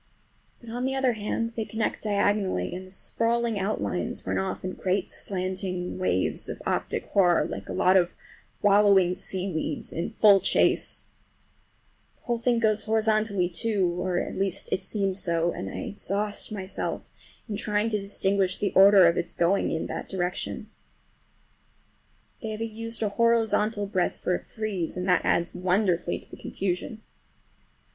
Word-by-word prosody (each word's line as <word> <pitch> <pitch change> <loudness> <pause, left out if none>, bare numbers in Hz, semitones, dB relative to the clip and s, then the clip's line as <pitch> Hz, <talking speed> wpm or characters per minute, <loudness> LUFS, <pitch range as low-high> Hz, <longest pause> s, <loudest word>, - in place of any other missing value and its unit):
But, 235 -2 -11
on 245 +2 -2
the 265 0 0
other 265 -2 +2
hand, 220 +2 -2
they 230 -1 -4
connect 220 0 -3
diagonally, 200 - +1
and 185 +1 -7
the - - -16
sprawling 230 +2 0
outlines 195 +3 -2
run - - 0
off 190 -1 -3
in 185 - -2
great 185 0 -1
slanting 185 -1 -3
waves 95 - 0
of - - -5
optic - - -1
horror, 175 -4 +4
like 95 0 -6
a - - -3
lot 185 +1 +3
of 175 -2 +3 0.5
wallowing 200 -3 +5
seaweeds 180 -5 -2
in 170 - -2
full 205 -2 +6
chase. - - +2 1.1
The - - -36
whole 240 -1 -1
thing 240 0 +2
goes 220 -2 +1
horizontally, 215 -3 +1
too, 180 -1 0
at - - -2
least 195 -1 -2
it 185 - 0
seems 195 -1 -1
so, 170 -2 0
and 95 - -5
I - - -5
exhaust 205 +1 -3
myself 195 -2 -4 0.4
in 210 - -3
trying 210 +1 0
to 210 -2 0
distinguish 195 -1 0
the 205 - -1
order 195 -1 +8
of 170 0 +4
its 170 - -3
going 175 +3 +2
in 160 - -2
that - - -5
direction. 180 -2 -3 1.7
They 225 - -4
have 215 +1 -5
used 225 0 -3
a 210 - +1
horizontal 220 -1 +2
breadth 190 -3 -1
for 180 - -1
a - - 0
frieze, 200 -7 -4
and 180 +1 -3
that 180 -2 +3
adds 170 0 +1
wonderfully 180 -1 +1
to - - -14
the - - -9
confusion. 195 +4 -4
200 Hz, 155 wpm, -26 LUFS, 180-215 Hz, 1.7 s, order